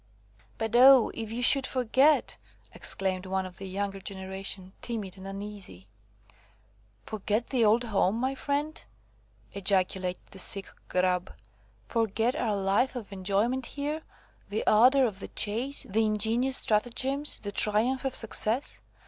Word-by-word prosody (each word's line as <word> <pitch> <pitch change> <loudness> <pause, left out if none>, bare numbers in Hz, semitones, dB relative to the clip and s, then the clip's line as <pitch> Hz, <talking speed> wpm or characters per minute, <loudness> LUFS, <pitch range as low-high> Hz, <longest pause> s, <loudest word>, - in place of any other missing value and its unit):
"But, 225 +1 -3
oh! 260 -1 +7
if 225 -1 -6
you 240 +2 -3
should 270 +1 +5
forget!" 265 +4 +2 0.4
exclaimed 190 -1 -3
one 190 0 -2
of 185 -1 -11
the 195 - -8
younger 195 +1 -4
generation, 190 -1 -5
timid 215 -6 -5
and 190 0 -11
uneasy. 195 - -7 1.2
"Forget 215 +2 -3
the 250 -4 +2
old 220 +3 +3
home, 205 -3 0
my 260 +3 -1
friend?" 290 +3 -3 0.7
ejaculated 190 -2 -1
the 190 - -10
sick 195 +1 +5 0.2
Grub, 180 0 0 0.6
"forget 225 +2 0
our 220 -4 -1
life 200 +7 0
of 215 -5 -7
enjoyment 205 +7 -1
here, 295 +2 -4 0.5
the 210 - -3
ardour 255 +5 +5
of 205 -5 -4
the - - -6
chase, 240 +7 0
the 220 +3 +1
ingenious 225 +5 +1
stratagems, 260 +6 +2
the 205 - -6
triumph 220 +7 +1
of 270 -1 -2
success? 225 +3 +1
215 Hz, 135 wpm, -27 LUFS, 195-250 Hz, 1.2 s, oh